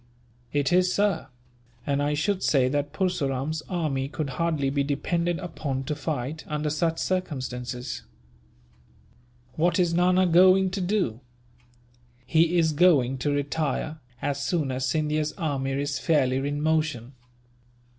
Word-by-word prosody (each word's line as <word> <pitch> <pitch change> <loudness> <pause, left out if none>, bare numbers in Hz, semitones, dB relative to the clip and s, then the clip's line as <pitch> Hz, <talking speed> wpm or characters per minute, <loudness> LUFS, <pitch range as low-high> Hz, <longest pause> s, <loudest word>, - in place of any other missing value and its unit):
"It 145 +1 +1
is, 180 0 +4
sir; 200 -3 +1 0.6
and 140 0 0
I 145 +1 +1
should 195 +5 0
say 135 -4 +3
that 145 +1 -1
Purseram's 155 -5 -1
army 150 -7 -1
could 145 -1 -4
hardly 150 -1 0
be 140 0 +1
depended 170 +5 -1
upon 145 -7 -4
to 145 - -2
fight, 150 0 -4
under 150 0 -2
such 165 +2 0
circumstances." 130 -8 -3 1.6
"What 175 +4 +2
is 175 -2 +2
Nana 180 +2 +4
going 185 +2 +5
to 195 +1 -3
do?" 180 - 0 1.1
"He 165 +4 +3
is 160 -2 +3
going 145 -6 +4
to 135 - 0
retire, 150 +2 -2 0.2
as 140 -1 -1
soon 150 -4 0
as 130 0 -1
Scindia's 155 +2 0
army 140 -6 -2
is 140 0 -2
fairly 135 -6 +2
in 145 +2 -2
motion." 155 -6 0
150 Hz, 135 wpm, -26 LUFS, 140-170 Hz, 1.6 s, going